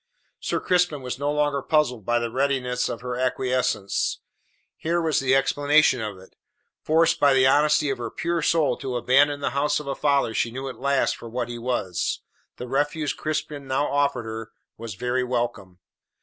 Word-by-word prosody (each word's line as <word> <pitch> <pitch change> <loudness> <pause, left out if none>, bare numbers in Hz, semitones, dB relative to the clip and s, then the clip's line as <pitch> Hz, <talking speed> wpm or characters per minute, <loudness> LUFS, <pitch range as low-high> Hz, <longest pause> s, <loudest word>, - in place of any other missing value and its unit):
Sir - - -1
Crispin 175 -6 +1
was 125 0 -5
no 145 +1 0
longer 145 -1 0
puzzled 130 -8 0
by 120 0 +3
the 120 -1 -2
readiness 130 -1 0
of 115 - -5
her 125 0 -4
acquiescence. 125 -5 0 0.6
Here 170 +2 -1
was 160 -3 +1
the 135 0 +2
explanation 145 -1 +3
of 105 -3 -5
it. 95 0 -17 0.5
Forced 165 +1 +3
by 140 -2 +5
the 130 0 +5
honesty 150 +1 +3
of 130 - -4
her 115 -1 -4
pure 170 +5 -2
soul 160 -3 +2
to 130 -2 -4
abandon 145 +4 +3
the - - -1
house 145 +2 +1
of 150 - -8
a 140 - -2
father 140 -4 +1
she 115 - 0
knew 130 +3 -6
at 130 - -10
last 140 -1 +1
for 115 - -10
what 120 0 -3
he 120 0 -6
was, 115 -7 -2 0.4
the 125 - -6
refuge 145 +3 -1
Crispin 150 -2 -4
now 130 +2 0
offered 140 -3 +1
her 110 0 -6 0.2
was 115 -3 -7
very 125 +3 -1
welcome. 120 -7 -3
135 Hz, 185 wpm, -24 LUFS, 120-145 Hz, 0.6 s, by